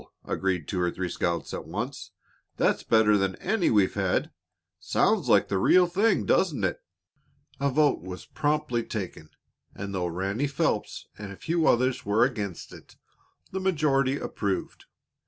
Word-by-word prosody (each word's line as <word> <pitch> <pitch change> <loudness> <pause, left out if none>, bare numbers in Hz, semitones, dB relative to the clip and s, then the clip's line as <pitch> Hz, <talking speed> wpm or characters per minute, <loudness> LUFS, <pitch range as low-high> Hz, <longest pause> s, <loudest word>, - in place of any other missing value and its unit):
agreed 90 -5 -1
two 90 - -2
or 90 - +2
three 90 +1 -3
scouts 85 0 -2
at - - -5
once. - - -5 0.5
"That's - - +2
better 105 -2 +4
than 95 -1 0
any 195 -1 0
we've 100 -4 +3
had. - - 0 0.5
Sounds - - +1
like - - +5
the 95 - 0
real 180 - +5
thing, 195 +4 +1
doesn't 155 - +2
it?" 90 - -1 0.8
A 140 0 +1
vote 145 - +2
was 90 +1 -8
promptly 150 -5 -1
taken, 95 -8 -6 0.5
and 100 0 -6
though 90 -2 -1
Ranny 95 +10 -1
Phelps 135 - -1
and 105 -2 -7
a - - -8
few 165 - 0
others 130 +1 +2
were 105 +3 +3
against 105 -8 -4
it, - - -14 0.6
the 190 - -3
majority 145 -7 +1
approved. 100 -7 -3
110 Hz, 155 wpm, -27 LUFS, 95-150 Hz, 0.8 s, like